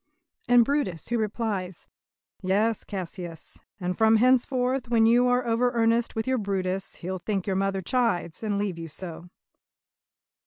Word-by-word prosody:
And 245 Hz, -1 st, +6 dB
Brutus 250 Hz, -, -1 dB
who 240 Hz, -1 st, 0 dB
replies: 205 Hz, -5 st, -3 dB, 0.5 s
"Yes, 210 Hz, +4 st, +1 dB
Cassius, 175 Hz, -3 st, -7 dB, 0.2 s
and 180 Hz, -1 st, -2 dB
from 220 Hz, +2 st, +4 dB
henceforth 255 Hz, +1 st, +2 dB
When 230 Hz, -2 st, +4 dB
you 240 Hz, +2 st, +5 dB
are 250 Hz, 0 st, +2 dB
over 235 Hz, +2 st, +2 dB
earnest 230 Hz, 0 st, +1 dB
with 220 Hz, -, -1 dB
your 260 Hz, -1 st, +1 dB
Brutus 195 Hz, -1 st, -2 dB
He'll 185 Hz, +1 st, -5 dB
think 195 Hz, 0 st, -2 dB
your 195 Hz, -, -1 dB
mother 195 Hz, 0 st, 0 dB
chides, 215 Hz, -7 st, 0 dB
and 210 Hz, -2 st, -1 dB
leave 200 Hz, -4 st, -2 dB
you 165 Hz, -, -6 dB
so." 170 Hz, +2 st, -9 dB
210 Hz, 150 wpm, -26 LUFS, 185-240 Hz, 0.5 s, And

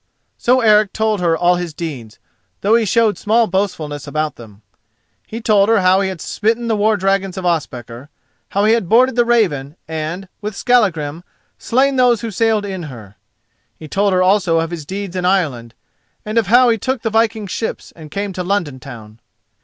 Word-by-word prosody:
So 255 Hz, +1 st, +3 dB
Eric 215 Hz, -3 st, +4 dB
told 220 Hz, -2 st, 0 dB
her 165 Hz, -2 st, +2 dB
all 175 Hz, +2 st, +3 dB
his 175 Hz, -3 st, -5 dB
deeds, 130 Hz, -10 st, -7 dB, 0.4 s
though 205 Hz, +3 st, +2 dB
he 230 Hz, -1 st, +3 dB
showed 220 Hz, +1 st, +2 dB
small 225 Hz, +2 st, +2 dB
boastfulness 180 Hz, -8 st, -3 dB
about 155 Hz, +1 st, -2 dB
them. 110 Hz, -3 st, -14 dB, 0.6 s
He 225 Hz, +2 st, -7 dB
told 210 Hz, -2 st, +3 dB
her 225 Hz, -3 st, +4 dB
how 185 Hz, +1 st, +4 dB
he 195 Hz, -, 0 dB
had 185 Hz, -4 st, -7 dB
smitten 225 Hz, +2 st, -1 dB
the 225 Hz, -, +1 dB
war 215 Hz, +1 st, +2 dB
dragons 195 Hz, -1 st, -1 dB
of 185 Hz, -, -4 dB
Ospakar, 130 Hz, -6 st, -3 dB, 0.4 s
how 200 Hz, +1 st, +1 dB
he 220 Hz, -, +4 dB
had 225 Hz, -7 st, -1 dB
boarded 250 Hz, +2 st, +4 dB
the 240 Hz, -1 st, +3 dB
Raven 165 Hz, -, +1 dB
and 160 Hz, +4 st, -5 dB
with 210 Hz, 0 st, -5 dB
Skallagrim 175 Hz, -, +1 dB, 0.4 s
slain 265 Hz, +3 st, +1 dB
those 245 Hz, -3 st, +3 dB
who 230 Hz, -2 st, -4 dB
sailed 220 Hz, 0 st, +1 dB
in 190 Hz, -2 st, -5 dB
her. 110 Hz, -6 st, -12 dB, 0.6 s
He 155 Hz, -, -10 dB
told 200 Hz, +5 st, +1 dB
her 185 Hz, 0 st, +3 dB
also 185 Hz, -3 st, +2 dB
of 165 Hz, +1 st, -2 dB
his 160 Hz, -4 st, -7 dB
deeds 195 Hz, 0 st, -5 dB
in 180 Hz, -, -2 dB
Ireland, 145 Hz, -11 st, 0 dB, 0.5 s
and 215 Hz, +2 st, +1 dB
of 220 Hz, -, -2 dB
how 245 Hz, +4 st, +5 dB
he 225 Hz, -1 st, +1 dB
took 260 Hz, 0 st, -2 dB
the 225 Hz, -, -1 dB
viking 225 Hz, -1 st, +1 dB
ships 220 Hz, +4 st, -5 dB
and 155 Hz, -2 st, -12 dB
came 200 Hz, +4 st, -4 dB
to 180 Hz, -, -4 dB
London 175 Hz, -8 st, -2 dB
town. 115 Hz, -5 st, -11 dB
195 Hz, 190 wpm, -17 LUFS, 160-220 Hz, 0.6 s, how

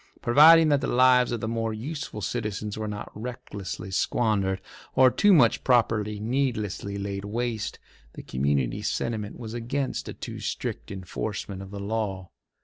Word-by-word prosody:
Providing 155 Hz, +6 st, +7 dB
that 145 Hz, -2 st, +3 dB
the 135 Hz, -, -1 dB
lives 125 Hz, 0 st, +5 dB
of 120 Hz, -2 st, -2 dB
the 110 Hz, -, -2 dB
more 115 Hz, -1 st, -2 dB
useful 140 Hz, -1 st, -5 dB
citizens 105 Hz, -1 st, -3 dB
were 110 Hz, 0 st, -4 dB
not 105 Hz, -1 st, -6 dB
recklessly 105 Hz, -5 st, -6 dB
squandered, 95 Hz, -1 st, +1 dB, 0.4 s
or 130 Hz, -1 st, +6 dB
too 205 Hz, -, +4 dB
much 130 Hz, -, +5 dB
property 110 Hz, -4 st, +2 dB
needlessly 110 Hz, -4 st, -2 dB
laid 100 Hz, 0 st, -4 dB
waste, 110 Hz, +1 st, -3 dB, 0.4 s
the -, -, -9 dB
community 65 Hz, -2 st, 0 dB
sentiment 110 Hz, -3 st, -2 dB
was 115 Hz, -2 st, -7 dB
against 125 Hz, +4 st, -3 dB
a -, -, -5 dB
too -, -, -7 dB
strict -, -, -4 dB
enforcement 100 Hz, +1 st, -5 dB
of 95 Hz, -, -9 dB
the 100 Hz, 0 st, -7 dB
law. 100 Hz, -3 st, -3 dB
110 Hz, 150 wpm, -26 LUFS, 100-125 Hz, 0.4 s, Providing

